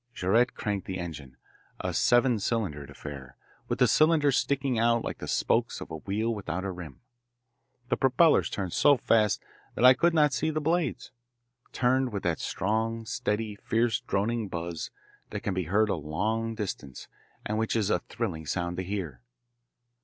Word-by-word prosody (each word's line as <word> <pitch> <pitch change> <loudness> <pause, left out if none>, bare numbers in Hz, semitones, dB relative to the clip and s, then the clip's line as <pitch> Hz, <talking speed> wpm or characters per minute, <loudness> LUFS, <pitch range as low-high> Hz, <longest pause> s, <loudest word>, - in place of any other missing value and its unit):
Jaurette 115 +7 +2
cranked 100 -3 -3
the 95 - -3
engine, 75 -7 -7 0.4
a - - -3
seven 120 -1 +3
cylindered 95 - -2
affair, 70 -3 -9 0.3
with - - -1
the - - +5
cylinders 155 -3 +4
sticking 135 -4 0
out 115 0 +3
like - - -5
the - - -6
spokes - - +1
of - - -9
a 80 - -4
wheel 105 +7 -1
without 95 -3 -4
a 95 - -2
rim. 85 -6 -9 0.9
The - - +1
propellers 135 +5 +4
turned 95 -4 -4
so 145 -2 +5
fast 110 -2 +2 0.3
that 125 - +3
I 130 - +10
could 170 +6 +2
not 150 -3 +4
see 155 +5 0
the 155 0 -1
blades 160 -2 -1 0.6
turned 130 0 +1
with 100 -2 -4
that 85 -2 0
strong, 110 +3 -1
steady, 105 0 -2
fierce 115 +2 0
droning 110 +3 -1
buzz 85 -2 -5 0.4
that - - -5
can 100 - -2
be 95 -1 -2
heard 105 +6 +2
a - - +2
long 110 +9 -2
distance 90 - -6 0.4
and 105 +1 -1
which 110 0 0
is 105 -2 +1
a 90 - +2
thrilling 90 -7 -5
sound 85 0 -2
to 95 - -2
hear. 90 -10 -4
105 Hz, 170 wpm, -28 LUFS, 90-120 Hz, 0.9 s, I